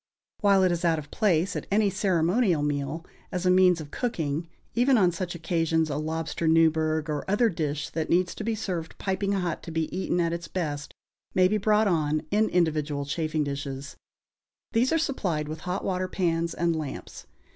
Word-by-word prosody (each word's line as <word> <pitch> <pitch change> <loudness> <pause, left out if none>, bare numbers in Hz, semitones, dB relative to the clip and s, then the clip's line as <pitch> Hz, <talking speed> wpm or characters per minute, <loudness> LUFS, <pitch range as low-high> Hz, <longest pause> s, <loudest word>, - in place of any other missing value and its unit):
While 200 -2 +4
it 185 - +4
is 175 0 -2
out 165 -2 +3
of 145 -2 -7
place, 185 -5 +1
at - - -4
any 205 0 +3
ceremonial 180 -2 +2
meal, 145 +3 -2 0.3
as 180 -1 -2
a 180 - +5
means 180 -2 +5
of 150 -2 -8
cooking, 165 - -2 0.3
even 250 +2 +4
on 185 -4 +4
such 175 0 -4
occasions 165 -2 0
a 140 - -1
lobster 160 +1 -2
Newburgh 160 -1 +3
or 150 -2 -2
other 225 +4 +3
dish 150 -5 -3
that 160 -1 -2
needs 175 0 +2
be 220 +1 -2
served 180 -6 -4
piping 195 +1 -1
hot 180 -3 -1
to - - -9
be 160 0 -2
eaten 185 -1 0
at 170 -1 +1
its 170 0 -5
best 150 -5 -4 0.4
may 185 0 +5
be 210 +3 +1
brought 210 +1 +3
on 155 -4 +1
in 215 +2 +3
individual 155 -4 0
chafing 155 +1 -1
dishes. 140 -1 -5 0.8
These 240 +3 +2
are 325 - +3
supplied 185 - -1
with 155 +1 -5
hot 185 +2 -2
water 185 -1 -1
pans 170 -3 -1
and 170 0 +1
lamps. 150 -4 -6
170 Hz, 185 wpm, -27 LUFS, 155-190 Hz, 0.8 s, a